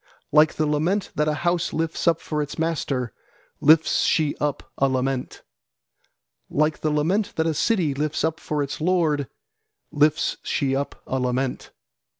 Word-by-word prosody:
Like 155 Hz, +1 st, +5 dB
the 155 Hz, -, +1 dB
lament 160 Hz, +7 st, 0 dB
that 150 Hz, 0 st, 0 dB
a 150 Hz, -, +1 dB
house 175 Hz, 0 st, +1 dB
lifts 165 Hz, +2 st, -2 dB
up 165 Hz, -1 st, +3 dB
for 150 Hz, -1 st, -2 dB
its 145 Hz, 0 st, -5 dB
master, 140 Hz, -7 st, -1 dB, 0.5 s
lifts 155 Hz, +2 st, +5 dB
she 155 Hz, -3 st, +2 dB
up 145 Hz, -2 st, -2 dB, 0.2 s
a 135 Hz, -, +3 dB
lament, 130 Hz, 0 st, -2 dB, 1.1 s
Like 155 Hz, +1 st, +1 dB
the 155 Hz, -, 0 dB
lament 165 Hz, +8 st, 0 dB
that 160 Hz, -, +1 dB
a 165 Hz, -, +1 dB
city 170 Hz, -2 st, +1 dB
lifts 150 Hz, +2 st, -2 dB
up 160 Hz, 0 st, 0 dB
for 150 Hz, -1 st, -2 dB
its 140 Hz, +2 st, -5 dB
lord, 160 Hz, -5 st, +1 dB, 0.6 s
lifts 150 Hz, +1 st, +2 dB
she 135 Hz, -2 st, 0 dB
up 140 Hz, +1 st, -4 dB
a 130 Hz, -, -2 dB
lament. 125 Hz, +1 st, -2 dB
150 Hz, 155 wpm, -24 LUFS, 140-160 Hz, 1.1 s, Like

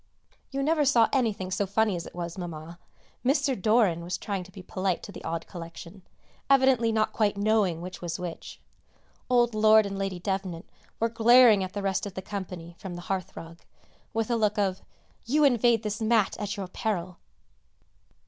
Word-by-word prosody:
You 275 Hz, 0 st, -2 dB
never 310 Hz, +1 st, +2 dB
saw 245 Hz, -5 st, +4 dB
anything 215 Hz, -8 st, 0 dB
so 195 Hz, +1 st, 0 dB
funny 210 Hz, 0 st, +1 dB
as 170 Hz, -, -5 dB
it -, -, -13 dB
was, 170 Hz, -1 st, -5 dB
Mamma. 170 Hz, -1 st, -7 dB, 0.4 s
Mr. 275 Hz, +1 st, +2 dB
Doran 205 Hz, -5 st, +2 dB
was 175 Hz, +2 st, -3 dB
trying 200 Hz, -3 st, -4 dB
to 190 Hz, -, -15 dB
be 190 Hz, 0 st, -11 dB
polite 185 Hz, -1 st, -2 dB
to -, -, -8 dB
the -, -, -10 dB
odd 165 Hz, 0 st, -3 dB
collection, 170 Hz, +2 st, -10 dB, 0.5 s
evidently 260 Hz, -4 st, +4 dB
not 220 Hz, -1 st, +1 dB
quite 205 Hz, -2 st, +1 dB
knowing 200 Hz, -5 st, +1 dB
which 180 Hz, +1 st, -8 dB
was 170 Hz, -2 st, -3 dB
which. 180 Hz, -2 st, -7 dB, 0.7 s
Old 240 Hz, -2 st, +3 dB
Lord 215 Hz, 0 st, +5 dB
and 200 Hz, 0 st, -4 dB
Lady 195 Hz, -2 st, -3 dB
Devnant 190 Hz, -2 st, -3 dB, 0.3 s
were 230 Hz, -, +2 dB
glaring 230 Hz, -2 st, +6 dB
at 185 Hz, -, -6 dB
the 205 Hz, -, -4 dB
rest 195 Hz, +1 st, -1 dB
of 190 Hz, -, -10 dB
the 190 Hz, -, -5 dB
company 180 Hz, -4 st, -7 dB
from 185 Hz, -3 st, -7 dB
the 175 Hz, -, -7 dB
hearth 185 Hz, -2 st, -5 dB
rug, 165 Hz, +1 st, -9 dB, 0.5 s
with 225 Hz, 0 st, -1 dB
a -, -, +3 dB
look 215 Hz, -1 st, +1 dB
of 195 Hz, -2 st, 0 dB, 0.5 s
"You 300 Hz, +5 st, +3 dB
invade 240 Hz, -4 st, +4 dB
this 210 Hz, +1 st, -3 dB
mat 220 Hz, -2 st, +2 dB
at 205 Hz, +1 st, -3 dB
your 195 Hz, -2 st, -4 dB
peril!" 185 Hz, -2 st, -3 dB
200 Hz, 185 wpm, -27 LUFS, 180-225 Hz, 0.7 s, glaring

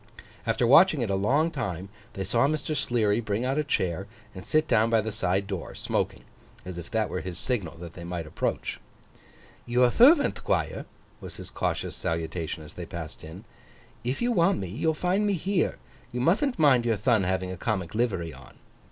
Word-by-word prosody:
After 120 Hz, -, +2 dB
watching 155 Hz, +3 st, +6 dB
it 110 Hz, -4 st, -1 dB
a -, -, +2 dB
long 140 Hz, +12 st, +2 dB
time, 100 Hz, -, -4 dB, 0.2 s
they 95 Hz, -, -3 dB
saw 115 Hz, +7 st, +2 dB
Mr. 155 Hz, +1 st, -2 dB
Sleary 115 Hz, -6 st, +1 dB
bring 110 Hz, +1 st, -1 dB
out 135 Hz, +3 st, 0 dB
a -, -, +2 dB
chair 95 Hz, -, -1 dB, 0.3 s
and 95 Hz, -, -8 dB
sit 155 Hz, 0 st, +2 dB
down 110 Hz, +1 st, +3 dB
by 115 Hz, -1 st, +4 dB
the 110 Hz, +1 st, -2 dB
side 100 Hz, -2 st, 0 dB
door, 95 Hz, -4 st, -5 dB
smoking; -, -, -2 dB, 0.4 s
as 90 Hz, -1 st, -6 dB
if 85 Hz, -, -9 dB
that 110 Hz, -1 st, 0 dB
were 90 Hz, -, -3 dB
his 90 Hz, -2 st, -6 dB
signal 90 Hz, -11 st, -2 dB
that 85 Hz, -1 st, -9 dB
they 85 Hz, -, -9 dB
might 85 Hz, -1 st, -4 dB
approach. 75 Hz, -, -3 dB, 0.9 s
'Your 120 Hz, +1 st, +4 dB
thervant, 285 Hz, -, +6 dB
Thquire,' -, -, -1 dB, 0.3 s
was -, -, -9 dB
his -, -, -8 dB
cautious -, -, -2 dB
salutation 80 Hz, -1 st, -3 dB
as 75 Hz, +1 st, -12 dB
they 90 Hz, -, -7 dB
passed 85 Hz, -2 st, -8 dB
in. -, -, -9 dB, 0.6 s
'If 125 Hz, -, -2 dB
you 245 Hz, -, +2 dB
want 190 Hz, -2 st, +3 dB
me 95 Hz, -, -4 dB
you'll 155 Hz, -, 0 dB
find 185 Hz, +6 st, +1 dB
me 205 Hz, -, +2 dB
here. 190 Hz, +1 st, 0 dB, 0.3 s
You 125 Hz, -, -3 dB
muthn't 220 Hz, -, +2 dB
mind 140 Hz, -7 st, +5 dB
your 115 Hz, -1 st, +2 dB
thon 110 Hz, +1 st, +3 dB
having 95 Hz, 0 st, -1 dB
a -, -, -4 dB
comic 95 Hz, -3 st, -2 dB
livery 95 Hz, -8 st, -1 dB
on. 65 Hz, -1 st, -14 dB
110 Hz, 195 wpm, -27 LUFS, 90-145 Hz, 0.9 s, watching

